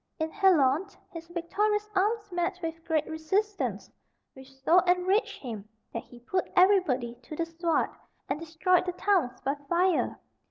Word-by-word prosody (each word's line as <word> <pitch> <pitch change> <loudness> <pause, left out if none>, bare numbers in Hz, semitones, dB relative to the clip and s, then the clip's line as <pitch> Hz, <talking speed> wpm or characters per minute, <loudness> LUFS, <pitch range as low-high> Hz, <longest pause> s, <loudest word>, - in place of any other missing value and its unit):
In 315 0 -2
Halone 370 -2 +3 0.2
his 330 -2 -9
victorious 415 +5 0
arms 420 +2 +1
met 355 +1 -1
with 325 0 -4
great 315 -2 +1
resistance, 385 +7 -2 0.4
which 265 0 -14
so 270 +7 +4
enraged 365 +4 +1
him 215 -5 -6 0.2
that 230 - -3
he 245 - -15
put 370 +9 -2
everybody 360 -11 +4
to 280 +5 -9
the 335 - -1
sword, 330 0 0 0.4
and 275 - -2
destroyed 330 +3 +1
the 360 - -1
towns 355 -11 +1
by 275 - 0 0.2
fire. 355 0 +2
340 Hz, 150 wpm, -28 LUFS, 305-380 Hz, 0.4 s, so